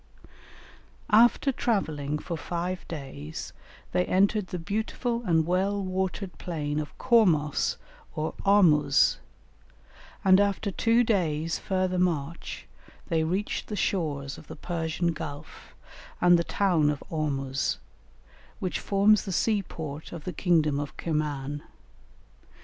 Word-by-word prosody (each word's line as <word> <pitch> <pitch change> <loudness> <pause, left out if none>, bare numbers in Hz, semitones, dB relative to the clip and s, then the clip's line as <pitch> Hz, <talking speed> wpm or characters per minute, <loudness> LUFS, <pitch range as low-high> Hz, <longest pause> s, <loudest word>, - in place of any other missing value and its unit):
After 240 +5 +5
travelling 155 - -1
for 170 +3 -5
five 175 +3 -4
days 135 - -7 0.4
they 90 - +2
entered 200 +1 +2
the 180 - -4
beautiful 220 +6 -2
and 160 -2 +3
well 190 +4 +1
watered 185 -2 -3
plain 150 -4 -2
of 150 - -6
Cormos 175 - +3 0.4
or 155 +1 -2
Ormuz, 155 -8 +4 1.1
and 190 0 +7
after 200 0 +1
two 230 +5 +3
days' 165 -7 0
further 185 -1 0
march 165 -3 -2 0.4
they 160 -1 +2
reached 185 +6 -2
the 210 - -4
shores 145 -9 -1
of - - -15
the - - -8
Persian 165 +1 -2
Gulf 150 -1 -9 0.4
and 175 0 +6
the - - +1
town 170 -6 +2
of 150 -1 -3
Ormuz, 135 -4 -1 0.8
which 185 - -2
forms 200 +1 +3
the 195 - -4
sea 210 +3 +2
port 155 -4 -7
of 170 -3 -7
the 180 - -4
kingdom 155 -4 +2
of 145 -1 -6
Kirman. 145 -3 -2
170 Hz, 120 wpm, -27 LUFS, 150-195 Hz, 1.1 s, and